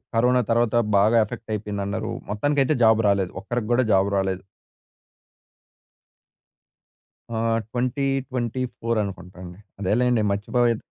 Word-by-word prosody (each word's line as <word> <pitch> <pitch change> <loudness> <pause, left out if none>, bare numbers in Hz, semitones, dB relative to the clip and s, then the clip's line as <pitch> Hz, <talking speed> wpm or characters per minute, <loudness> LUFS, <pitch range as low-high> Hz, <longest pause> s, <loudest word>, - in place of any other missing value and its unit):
Corona 125 +2 +3
తర్వాత 120 0 +2 0.2
బాగా 110 +4 +4
effect 110 +1 -8
అయిపోయిందన్నారూ, 105 +1 -3 0.2
మొత్తానికైతే 145 +6 +1
జాబ్ 110 0 +5
రాలేదు. 100 -3 +1
ఒక్కరికి 115 +2 -3
కూడా 130 +2 +3
జాబ్ 95 +1 +3
రాలేదు. 95 -1 -1 2.9
ఆహ్, 115 0 +1
2024 125 -2 -2
అనుకుంటాండి. 90 -2 -9 0.2
అదేలెండి. 115 +4 +2
మర్చిపోత 115 +3 +1
115 Hz, 95 wpm, -23 LUFS, 100-125 Hz, 2.9 s, జాబ్